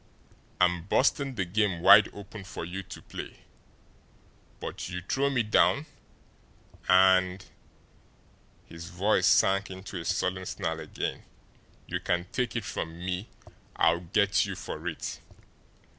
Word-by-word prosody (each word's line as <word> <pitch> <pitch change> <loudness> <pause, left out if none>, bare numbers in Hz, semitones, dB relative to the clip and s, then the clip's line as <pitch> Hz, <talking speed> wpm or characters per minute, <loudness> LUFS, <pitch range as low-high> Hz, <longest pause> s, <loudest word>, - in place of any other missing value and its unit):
I'm 90 -1 +2
busting 135 +3 +2
the 95 - -1
game 95 -1 0
wide 100 +3 +8
open 100 0 -10
for 95 -3 -6
you 95 +3 -5
to - - -11
play, - - -9 1.2
but - - -6
you 90 -1 -5
throw 140 +1 +1
me 125 -4 +1
down, 125 +6 +3 1.0
and" 95 0 +4 1.2
his 85 0 -10
voice 95 +5 +2
sank 100 0 +4
into 95 0 -7
a - - -7
sullen 90 +1 -1
snarl 80 0 -3
again 80 - -4 0.6
"you - - -3
can 90 0 -1
take 125 -2 -2
it 115 -3 -2
from 80 -4 -5
me, 90 +3 -4 0.5
I'll 85 +1 +3
get 100 +3 +2
you - - -4
for - - -6
it!" - - -4
95 Hz, 130 wpm, -28 LUFS, 90-105 Hz, 1.2 s, wide